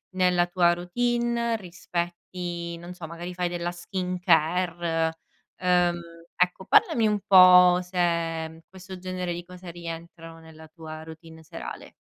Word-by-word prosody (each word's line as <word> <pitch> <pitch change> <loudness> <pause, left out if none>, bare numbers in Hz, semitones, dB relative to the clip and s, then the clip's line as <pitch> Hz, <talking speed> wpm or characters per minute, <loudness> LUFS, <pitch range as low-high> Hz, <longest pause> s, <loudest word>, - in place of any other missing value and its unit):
nella 180 -1 +3
tua 175 -1 +3
routine? 235 +5 0
Rispetti 175 -1 -5
non 175 +1 -10
so, 175 -2 -8
magari 175 +2 -7
fai 180 0 0
della 175 0 -3
skincare, 175 -2 0 0.5
uhm, 180 -1 +2 0.4
ecco, 180 +1 +1
parlami 220 +3 +4
un 210 -1 +1
po' 180 -2 +8
se, 180 +1 -9 0.5
uhm, 160 0 -14
questo 190 0 -10
genere 180 -1 -4
di 175 - -6
cose 180 0 -11
rientrano 165 -1 -9
nella 160 -1 -14
tua 155 -1 -9
routine 160 0 -12
serale. - - -9
175 Hz, 130 wpm, -26 LUFS, 170-185 Hz, 0.5 s, po